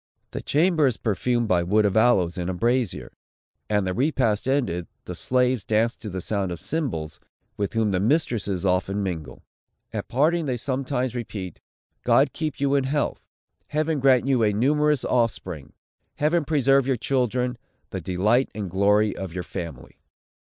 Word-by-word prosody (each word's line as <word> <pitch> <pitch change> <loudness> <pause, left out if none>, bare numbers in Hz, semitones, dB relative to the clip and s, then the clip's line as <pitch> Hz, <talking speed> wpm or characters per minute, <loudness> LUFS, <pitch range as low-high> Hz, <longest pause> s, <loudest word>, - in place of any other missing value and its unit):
The - - -5
chamber 160 -1 +3
is 125 - -1
perfumed 120 +3 0
by 90 -3 +3
wood 105 +5 +2
of 100 - +1
aloes, 110 -7 +3
in 90 0 -3
a 95 - -2
brazier; 120 +2 -1 0.6
and, 105 -2 +1
the 95 - -1
repast 125 - +1
ended, 110 -12 0 0.2
the - - -5
slaves 125 -3 +1
dance 115 +2 +1
to 105 - -7
the 95 -1 -4
sound 100 -1 -2
of 85 - -5
cymbals, 110 - -3 0.4
with 100 -1 -2
whom 110 -2 +1
the 90 - +1
mistresses 110 - 0
often 95 +2 +1
mingle. 80 -9 -5 0.5
At - - -4
parting 155 +5 +1
they 125 -2 -1
several 130 +2 -2
times 125 -2 -1
repeat, 105 -7 -6 0.4
"God - - +3
keep 155 -4 -3
you 140 0 +1
in 140 -2 +2
health! 145 +2 -1 0.5
Heaven 155 +2 0
grant 130 -2 +4
you 135 -3 +2
a 105 -2 +3
numerous 150 +5 +2
offspring! 95 - -1 0.4
Heaven 155 +2 +1
preserve 135 -3 +3
your 135 -2 +1
children; 125 -1 0 0.3
the - - -4
delight 105 +8 +1
and 100 -5 -4
glory 105 +3 +3
of 95 -3 -6
your 90 - -3
family!" 85 -10 -8
115 Hz, 165 wpm, -24 LUFS, 95-135 Hz, 0.6 s, grant